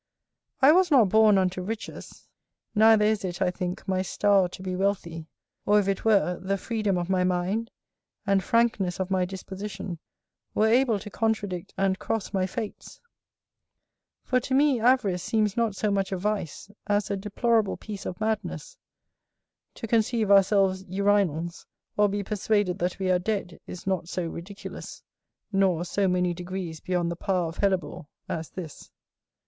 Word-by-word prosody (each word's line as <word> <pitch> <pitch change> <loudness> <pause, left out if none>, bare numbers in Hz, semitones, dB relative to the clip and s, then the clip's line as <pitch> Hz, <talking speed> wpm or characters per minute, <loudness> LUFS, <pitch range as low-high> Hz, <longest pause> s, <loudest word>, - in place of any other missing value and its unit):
I 275 - +9
was 365 +2 +4
not 250 - +5
born 215 0 +5
unto 185 -1 0
riches, 220 +4 -7 0.5
neither 220 0 +5
is 215 -1 +1
it, 175 -2 -4
I 185 -2 +2
think, 180 +1 -5
my 185 -1 +1
star 195 0 +2
to 185 +1 -10
be 185 -1 -3
wealthy; 175 -4 -2 0.4
or 210 0 +4
if 200 - -1
it 195 -1 -1
were, 200 -5 +2
the 195 +2 -1
freedom 210 -2 -1
of 175 -1 -2
my 185 -1 +1
mind, 185 +5 0 0.6
and 195 -1 +2
frankness 215 -5 +1
of 190 0 -2
my 185 -1 +2
disposition, 190 -1 -7 0.6
were 215 - +3
able 235 0 +3
to 205 +1 -9
contradict 205 -6 -2
and 195 -1 +1
cross 220 -2 -3
my 190 -1 +1
fates: 205 +3 -7 1.2
for 255 - +1
to 260 +1 -2
me 280 -3 +4
avarice 225 -7 +2
seems 215 +1 0
not 230 -4 0
so 210 +1 0
much 195 -1 0
a 190 - -1
vice, 205 -1 -3 0.2
as 205 0 0
a - - +1
deplorable 215 +2 0
piece 205 -3 -7
of 175 - -6
madness; 220 - -3 1.0
to - - -6
conceive 225 -1 +1
ourselves 195 -1 +4
urinals, 190 -4 0 0.3
or 210 0 +3
be 205 +1 -2
persuaded 205 -2 0
that 175 +1 -1
we 190 -1 0
are 180 - +3
dead, 190 -3 -3
is 180 - -8
not 185 -3 -1
so 180 -2 -2
ridiculous, 175 +5 -8 0.5
nor 190 -4 +2
so 195 +2 0
many 180 -1 +1
degrees 175 -2 -6
beyond 175 -2 -1
the - - -3
power 180 -1 -1
of 165 - -10
hellebore, 185 -7 -1 0.2
as 160 -1 -4
this. 170 -5 -9
195 Hz, 165 wpm, -26 LUFS, 180-215 Hz, 1.2 s, I